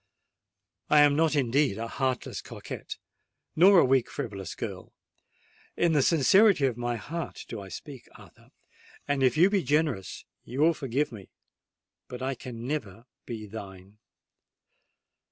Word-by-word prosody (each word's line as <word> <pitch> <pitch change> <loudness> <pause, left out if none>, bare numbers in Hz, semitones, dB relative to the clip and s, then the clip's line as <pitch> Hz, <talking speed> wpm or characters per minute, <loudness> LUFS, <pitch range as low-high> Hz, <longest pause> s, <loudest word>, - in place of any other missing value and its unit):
"I 150 0 +6
am 145 -1 +5
not 160 -1 +2
indeed 135 -3 +1
a 115 +1 -4
heartless 130 +1 -2
coquette—nor 190 +4 -1
a 170 - +6
weak 130 -1 +2
frivolous 100 -4 -6
girl:—in 170 -1 -6
the 145 - +4
sincerity 175 +3 +4
of 130 -4 0
my 120 0 -2
heart 165 +9 -6
do 115 -4 -6
I 95 - -10
speak, 135 +4 -10
Arthur;—and 145 -1 -9
if 130 0 +3
you 180 +5 +5
be 200 -2 +2
generous 145 - -1 0.2
you 130 +4 -4
will 165 +2 +5
forgive 140 0 -2
me—but 115 +3 -15
I 135 +1 -1
never 120 -2 -4
can 115 +6 -19 0.2
be 110 -3 -6
thine!" 100 -1 -10
130 Hz, 130 wpm, -27 LUFS, 115-150 Hz, 0.2 s, I